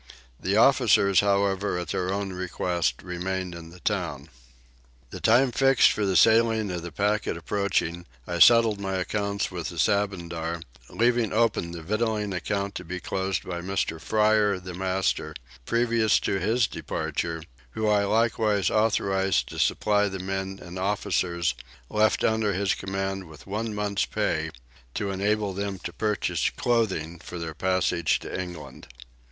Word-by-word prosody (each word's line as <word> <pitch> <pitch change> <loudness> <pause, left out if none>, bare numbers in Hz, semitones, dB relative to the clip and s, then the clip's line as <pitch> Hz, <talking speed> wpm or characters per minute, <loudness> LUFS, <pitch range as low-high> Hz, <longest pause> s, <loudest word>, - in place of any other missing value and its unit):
The 100 +3 0
officers 115 -6 +5
however 100 -1 +1
at 85 -2 -4
their 90 0 -1
own 100 -1 -2
request 90 -1 -2
remained 90 0 -3
in 85 -1 -9
the 85 +1 -15
town. 85 -8 -2 0.8
The - - -7
time 125 +3 +4
fixed 135 +1 +5
for 105 -2 -1
the 95 - 0
sailing 110 -1 +4
of 90 -1 -3
the 85 0 -7
packet 100 +2 0
approaching, 85 -1 -1 0.2
I 85 -1 -3
settled 115 -1 +6
my 95 -1 -2
accounts 100 +2 -2
with 85 -3 -4
the 85 - -9
Sabandar, 85 -2 -1 0.3
leaving 120 -2 +1
open 110 -6 +1
the 85 -1 -7
victualling 105 +1 -1
account 100 +2 -2
to - - -7
be 90 +2 -5
closed 95 +1 -2
by 85 -1 -5
Mr. 95 -3 -2
Fryer 105 -2 +3
the 90 0 -8
master 95 -4 -1 0.3
previous 115 -2 +2
to 95 - 0
his 110 +5 +2
departure, 85 -4 -3 0.3
who 110 - -1
I 105 -1 +3
likewise 110 -3 +2
authorised 95 -3 +1
to - - -7
supply 105 -1 +2
the 95 -1 -4
men 95 +1 -4
and 90 +1 -8
officers 90 -5 0 0.4
left 110 0 +2
under 110 -2 +2
his 95 +1 +1
command 95 0 -3
with 80 -1 -13
one 105 +2 -3
month's 105 -1 0
pay 80 +1 -1 0.5
to 100 -1 -2
enable 100 +1 0
them 100 0 -3
to 85 - -5
purchase 105 +2 0
clothing 95 -9 -1
for 90 +1 -8
their 85 -1 -5
passage 90 -1 +1
to 95 - -4
England. 90 -4 -9
95 Hz, 150 wpm, -26 LUFS, 90-105 Hz, 0.8 s, settled